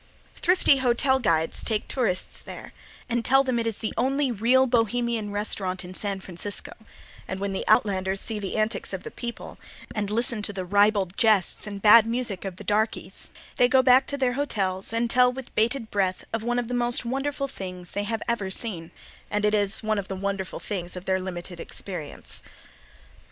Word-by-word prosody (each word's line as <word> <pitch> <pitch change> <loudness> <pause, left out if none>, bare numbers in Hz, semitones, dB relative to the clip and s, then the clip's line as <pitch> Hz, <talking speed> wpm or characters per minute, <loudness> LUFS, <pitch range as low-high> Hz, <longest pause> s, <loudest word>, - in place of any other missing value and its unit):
Thrifty 360 -5 +4
hotel 265 +1 +2
guides 165 -8 +1
take 215 -2 0
tourists 210 -9 -1
there - - -10 0.3
and 240 -1 -1
tell 270 +3 +5
them 255 -3 0
it 230 - -1
is 225 - -1
"the 215 - -4
only 270 +2 +1
real 240 +4 +4
Bohemian 235 -2 0
restaurant 195 -3 -2
in 180 - -8
San 200 0 -2
Francisco," 190 +2 -6 0.6
and 190 - -4
when 200 0 -2
the 190 - -1
outlanders 195 -3 +2
see 220 0 -2
the 195 -2 -3
antics 215 +1 -1
of - - -4
the 455 - -7
people 240 - -7 0.3
and 205 -2 -2
listen 230 0 0
to 205 - -3
the 190 -2 -5
ribald 200 -1 +3
jests 215 -3 +2
and 200 -1 -6
bad 220 +1 +8
music 230 -5 -1
of 190 -2 -4
the - - -10
darkeys, 215 +2 0 0.3
they 245 - +5
go 260 0 +5
back 255 +1 +5
to 280 - -3
their 255 -2 +1
hotels 195 -9 -2
and 230 +1 +1
tell 250 +1 +5
with 260 0 -9
bated 230 +1 0
breath 190 -2 0
of 225 - -1
one 240 +2 -1
of 245 -2 -1
the 245 - -4
most 240 0 +1
wonderful 275 +3 -2
things 180 -6 -6
they 205 0 -2
have 225 +1 -2
ever 230 -5 -1
seen, 190 -5 -3 0.4
and 210 0 0
it 210 - +2
is 205 0 +2
one 215 -1 +1
of 195 - -5
the 190 - -4
wonderful 195 0 -3
things 180 -4 -4
of 180 +1 -7
their 190 0 +1
limited 175 -1 -6
experience. 175 -6 -6
215 Hz, 195 wpm, -26 LUFS, 195-245 Hz, 0.6 s, bad